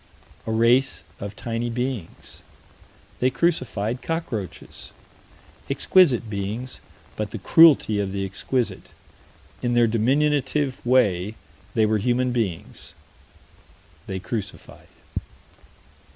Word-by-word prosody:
A - - -1
race 120 +4 +3 0.2
of 100 0 -6
tiny 115 +2 -3
beings. 125 -6 -5 0.8
They 130 - +3
crucified 125 -8 -1
cockroaches. 135 - -5 0.8
Exquisite 140 -12 +4
beings 105 +5 -4 0.4
but 105 -1 -3
the 115 - -6
cruelty 140 - +5
of 100 -1 -1
the 100 0 -2
exquisite. 120 +5 -3 0.7
In 120 -1 0
their 120 0 +5
diminutive 135 +4 +1
way 110 -5 +2 0.4
they 110 - +4
were 110 0 +1
human 125 +3 +1
beings. 110 -9 -4 1.1
They 95 - -3
crucified. 105 +2 -7
115 Hz, 95 wpm, -24 LUFS, 105-130 Hz, 1.1 s, cruelty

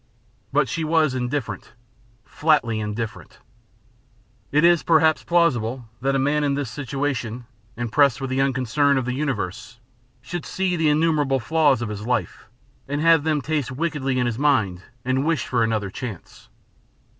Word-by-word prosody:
But 140 0 +2
she 165 +6 -3
was 155 -3 +2
indifferent, 130 0 -4 0.5
flatly 135 -8 +1
indifferent. 110 +2 -5 1.1
It 150 +2 +3
is, 175 -1 +5
perhaps, 160 -1 +3
plausible 130 -9 +1
that 135 +1 +1
a - - +3
man 145 +3 +1
in 140 -1 +1
this 140 -5 -3
situation, 130 -3 -3 0.3
impressed 120 +3 +2
with 135 -1 -4
the 130 +1 +1
unconcern 135 +2 +2
of 130 - -1
the 125 - -2
universe, 125 -4 -4 0.4
should 175 -1 -6
see 190 -1 -1
the 160 -2 +2
innumerable 150 -3 +2
flaws 145 -3 +2
of 115 - -4
his 105 +1 -6
life, 125 - -2 0.4
and 145 +1 -2
have 165 0 +5
them 155 -2 0
taste 150 -1 -2
wickedly 135 -2 -2
in 125 - +1
his 120 0 -2
mind 110 -12 +1 0.2
and 130 +1 +1
wish 165 0 0
for 125 -2 +1
another 110 -3 -1
chance. 110 -5 -8
135 Hz, 155 wpm, -23 LUFS, 120-150 Hz, 1.1 s, is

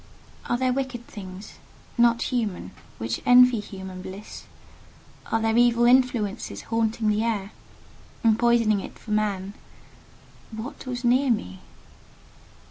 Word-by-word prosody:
Are 240 - +2
there 255 0 +1
wicked 255 -3 -4
things, 190 -1 -10 0.4
not 235 -1 +3
human, 220 -8 -2 0.3
which 115 +1 -3
envy 250 -1 +6
human 190 -3 -8
bliss? 195 +3 -9 0.9
Are 225 - +2
there 225 0 +1
evil 240 0 +4
influences 240 -4 +1
haunting 225 -1 -1
the 210 +1 +1
air, 210 -3 -2 0.7
and 225 -1 +3
poisoning 235 -3 +3
it - - -9
for 220 - -10
man? 205 -2 -1 1.0
What 225 +4 -8
was 250 0 -4
near 255 +3 +3
me? 95 - -1
225 Hz, 125 wpm, -25 LUFS, 205-240 Hz, 1.0 s, envy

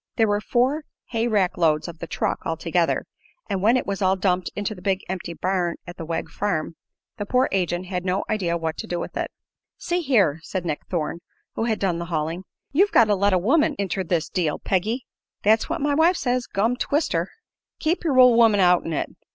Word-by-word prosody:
There 225 -2 +3
were 205 0 +1
four 260 +8 +1 0.2
hay 230 0 0
rack 200 -7 +1
loads 155 -2 +2
of 170 -2 -9
the - - -6
"truck," - - -1
altogether, - - 0 0.4
and 195 -2 -2
when 230 +5 +4
it - - -2
was 200 0 -3
all 190 0 +3
dumped 185 -1 0
into 205 +1 -2
the 180 - -12
big 190 0 0
empty 180 -2 -5
barn 180 -2 0
at 175 +1 -9
the 165 - -6
Wegg 165 0 -3
farm 170 -5 -2 0.4
the 205 - -3
poor 255 +3 +3
agent 180 -1 0
had 180 -1 -3
no 185 +1 0
idea 175 -5 0
what 160 -1 -3
to - - -5
do 175 - -2
with - - -6
it. - - -2 0.5
"See 350 +1 -1
here," 205 - +2
said 180 +2 -4
Nick 155 -3 -3
Thorne, 170 -1 -2 0.3
who 225 - -1
had 220 -2 0
done 180 -4 0
the 170 - -4
hauling, 165 +2 -3 0.3
"you've 390 +8 +3
got 230 - +6
to 205 - +4
let 200 +1 +2
a - - +5
woman 290 - +2
inter 195 -1 -1
this 165 -2 0
deal, 165 -5 -1
Peggy." 220 +7 -1 0.4
"That's 220 +5 +3
what 330 -1 -2
my 290 0 +1
wife 330 +4 +4
says, 250 -1 -1
gum 225 +5 0
twist 295 +4 0
her." - - 0 0.5
"Keep 330 +4 0
yer 290 -6 +1
ol' 250 -1 +8
woman 225 -3 +5
out'n 180 -3 +3
it. - - -3
195 Hz, 215 wpm, -23 LUFS, 175-240 Hz, 0.5 s, ol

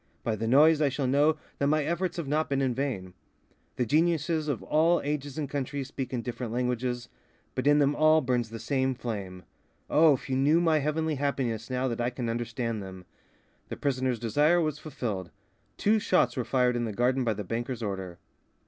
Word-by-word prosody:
By 115 - 0
the 110 +2 -3
noise 150 +5 +5
I 145 - +3
shall 135 +1 -2
know 145 +4 +3 0.2
that 140 - +2
my 155 +1 +2
efforts 170 +3 -2
have 165 -4 -3
not 155 +3 0
been 140 -1 0
in 130 -2 +1
vain. 115 -9 -3 0.6
The 125 - 0
geniuses 160 +2 +1
of 140 -6 -2
all 165 +3 +3
ages 145 -1 -3
and 150 -2 -2
countries 140 0 -4
speak 135 -3 -5
in 120 -3 -3
different 120 -1 -5
languages; 125 0 -2 0.5
but 130 +2 -2
in 145 0 +6
them 145 0 +3
all 155 0 +5
burns 125 -4 -1
the 115 - -7
same 130 +3 0
flame. 100 -7 -5 0.5
Oh, 155 -1 +6
if - - -9
you 130 - -1
knew 145 +5 +4
my 165 -3 +3
heavenly 150 +1 -1
happiness 130 -5 -2
now 130 +1 0
that 120 -1 -2
I 120 - +1
can 125 -1 -4
understand 115 -1 -3
them!" 95 -1 -9 0.6
The - - -5
prisoner's 130 -3 0
desire 145 +10 +2
was 155 -3 -1
fulfilled. 115 - -4 0.5
Two 215 +2 +3
shots 185 - +2
were 125 - -1
fired 125 -2 +2
in 120 -1 -1
the 110 - -4
garden 125 +4 +1
by 115 -3 0
the 105 - -4
banker's 120 +3 -4
order. 95 -4 -4
130 Hz, 200 wpm, -28 LUFS, 120-150 Hz, 0.6 s, in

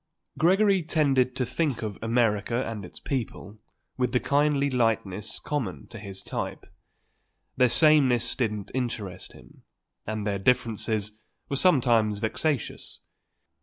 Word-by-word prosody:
Gregory 195 +3 +4
tended 140 -6 +1
to 130 - -1
think 140 -3 -1
of 105 -3 -5
America 115 +1 +1
and 110 -3 -5
its 90 - -10
people 110 -5 -5 0.4
with 125 -1 0
the 125 - +3
kindly 145 0 +2
lightness 110 -5 0
common 130 -11 -4
to 115 - -10
his 100 -2 -7
type. - - -5 0.9
Their 125 -1 +4
samenesses 130 -4 +4
didn't 105 -5 -2
interest 115 -7 -4
him, - - -17 0.5
and 110 -1 -3
their 100 -2 -1
differences 110 -2 0 0.3
were 140 - -1
sometimes 120 - +3
vexatious. 125 +5 -2
120 Hz, 125 wpm, -26 LUFS, 105-140 Hz, 0.9 s, Gregory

